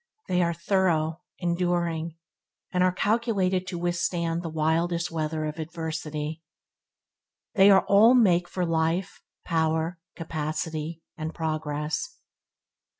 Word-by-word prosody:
They 180 0 +2
are 170 -1 +1
through, 170 -3 +1 0.2
enduring, 170 -2 -1 0.5
and 180 0 +2
are 185 - +4
calculated 195 -3 +1
to 180 - -4
withstanding 170 -1 -1
the 170 - -4
wildest 165 +2 0
weather 155 -1 -2
of 155 +1 -5
adversity. 160 -1 -4 1.1
They 195 0 +7
all 200 +5 +6
make 180 -7 +4
for 180 0 -2
life, 165 +3 0 0.2
power, 160 +1 0 0.2
capacity, 160 0 -4
and 155 +1 -5
progress. 155 -1 -3
165 Hz, 105 wpm, -26 LUFS, 160-180 Hz, 1.1 s, They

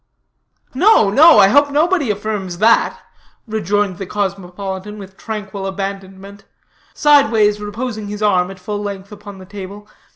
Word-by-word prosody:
"No, 295 - +4
no 305 +4 +7
I 195 -2 +6
hope 285 +5 +4
nobody 305 -1 +1
affirms 205 -3 -4
that," 225 +4 +3 0.5
rejoined 205 -3 -2
the 195 - -6
cosmopolitan, 195 0 -5
with 195 -2 -11
tranquil 200 -3 -6
abandonment; 195 0 -7 0.5
sideways 220 -8 +3
reposing 215 +1 -5
his 210 +1 -5
arm 185 -3 +2
at 195 - -10
full 205 +3 -5
length 200 -1 -7
upon 205 -1 -11
the 190 - -12
table. 200 +1 -10
205 Hz, 135 wpm, -17 LUFS, 195-215 Hz, 0.5 s, no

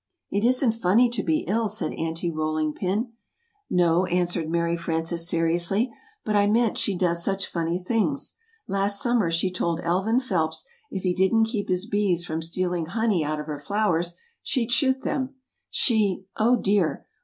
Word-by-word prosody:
"It 200 +1 0
isn't 250 0 +3
funny 225 +3 +3
to 235 -4 -1
be 160 -4 0
ill," 220 +3 +1
said 215 +2 -2
Aunty 165 +1 -2
Rolling 155 -1 -1
Pin. 210 - -2 0.6
"No," 175 0 +3
answered 175 -2 0
Mary 170 0 +1
Frances, 165 0 -2
seriously, 175 +8 +1 0.3
"but 215 - 0
I 205 0 +4
meant 225 +1 +2
she 200 - 0
does 170 -1 +1
such 195 0 -1
funny 170 0 -2
things: 225 +9 -1 0.3
Last 200 +1 +1
summer, 240 -7 +2
she 165 +3 0
told 170 -2 -1
Elvin 190 +8 +1
Phelps 160 -10 -1 0.2
if 190 - -5
he 180 -1 +1
didn't 190 +5 +3
keep 220 -3 -3
his 185 +2 0
bees 200 -5 0
from 160 -1 -3
stealing 175 0 -2
honey 205 -2 +1
out 150 +1 -2
of 150 - -5
her 150 -2 -5
flowers, 175 -1 0 0.3
she'd 245 -3 -1
shoot 265 0 +2
them 265 0 -2 0.3
she 205 -6 +1
(oh, 235 +3 +4
dear!) 200 -7 +1
185 Hz, 165 wpm, -25 LUFS, 170-220 Hz, 0.6 s, I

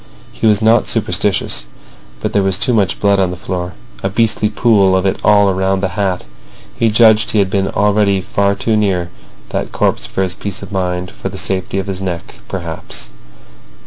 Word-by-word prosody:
He - - 0
was 105 0 +3
not 110 +1 +4
superstitious, - - 0 0.5
but - - -2
there 100 - +3
was 95 -1 +2
too 125 +4 0
much 100 -6 +1
blood 100 -1 +3
on 95 -2 +2
the 90 - -5
floor; 90 0 -4 0.3
a 95 - -1
beastly 110 0 +1
pool 100 -5 +3
of 95 0 +1
it 95 - 0
all 100 -2 +5
round 95 +1 0
the 95 - +1
hat. 95 -1 -2 0.5
He 115 - +2
judged 110 0 +5
he - - 0
had 100 -2 +2
been 100 -2 +1
already 100 -1 +2
far 100 +1 0
too 110 +1 0
near 95 -5 0 0.4
that - - -3
corpse - - 0
for 95 - -1
his 90 -2 -1
peace 100 +2 -6
of 100 - -9
mind—for 90 0 -3
the 95 - -8
safety 95 +2 -1
of 95 - -1
his 95 -1 -4
neck, 90 -3 -5
perhaps! - - -5
95 Hz, 190 wpm, -16 LUFS, 95-105 Hz, 0.5 s, all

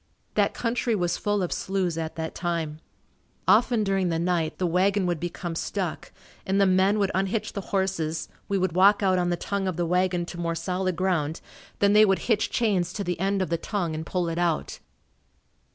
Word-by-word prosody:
That - - +1
country 235 -1 0
was 175 -3 0
full 205 -2 0
of 175 - -1
sloughs 190 -3 -1
at 160 -1 -4
that 160 0 -4
time. 165 -3 -3 0.7
Often 230 0 +4
during 195 -2 +1
the 165 - 0
night, 170 -2 0
the 185 - 0
wagon 190 +3 +2
would 175 -3 -1
become 175 0 -4
stuck, 180 +1 -3 0.3
and 195 +1 0
the 200 - +5
men 190 +2 +3
would 200 -2 +1
unhitch 195 +3 -1
the 200 - -3
horses, 185 -5 -1 0.2
we 200 - +1
would 185 -1 +1
walk 195 +4 +5
out 185 -1 +3
on 175 0 +1
the 175 - 0
tongue 200 +2 -2
of 185 -3 -2
the 175 - 0
wagon 180 0 +1
to 175 - -8
more 170 -1 -1
solid 185 +1 -1
ground, 165 -4 0 0.4
then 200 0 +3
they 210 +1 +7
would 195 -3 +4
hitch 225 -2 +1
chains 200 -7 0
to 205 - -3
the 180 -3 -3
end 195 +1 +1
of 180 - -5
the 170 - +2
tongue 175 -3 -2
and 155 +1 -4
pull 180 -2 -1
it 165 +1 -2
out. 170 -3 -1
185 Hz, 205 wpm, -26 LUFS, 170-200 Hz, 0.7 s, they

